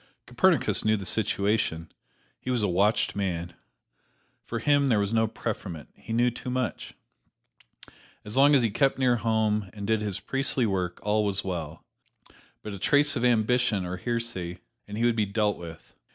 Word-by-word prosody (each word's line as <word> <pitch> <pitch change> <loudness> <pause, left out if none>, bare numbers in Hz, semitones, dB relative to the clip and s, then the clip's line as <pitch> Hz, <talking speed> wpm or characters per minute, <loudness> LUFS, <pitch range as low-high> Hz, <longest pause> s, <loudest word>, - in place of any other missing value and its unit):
Copernicus - - +2
knew 110 0 +2
the 100 - -6
situation 100 -6 +1 0.5
he - - -7
was 125 -4 0
a - - +2
watched 100 +5 +1
man. 85 -3 -3 0.9
For 115 - -5
him 145 +4 +2
there 115 -5 +3
was 100 +1 0
no 110 0 +3
preferment: 100 -8 -6
he - - -11
knew 120 +2 +2
too 120 - -7
much! 125 -3 -3 1.3
As 105 - -4
long 140 +2 +6
as 130 - +4
he 115 - +1
kept 135 +5 +1
near 125 -2 +2
home 110 -3 0
and 100 -2 -7
did 110 0 +1
his 100 -2 -3
priestly 135 +3 +1
work, 90 -4 -2
all 105 +1 +1
was 100 -1 -1
well; 85 -4 -5 0.8
but 105 - -6
a 100 - -7
trace 145 +6 +3
of 120 - -2
ambition 120 -3 +2
or 90 +1 -4
heresy, 115 -5 -3 0.3
and 105 0 -7
he 115 - +1
would 120 -1 +2
be 105 -2 0
dealt 105 0 0
with. 85 -2 -11
110 Hz, 175 wpm, -27 LUFS, 95-120 Hz, 1.3 s, long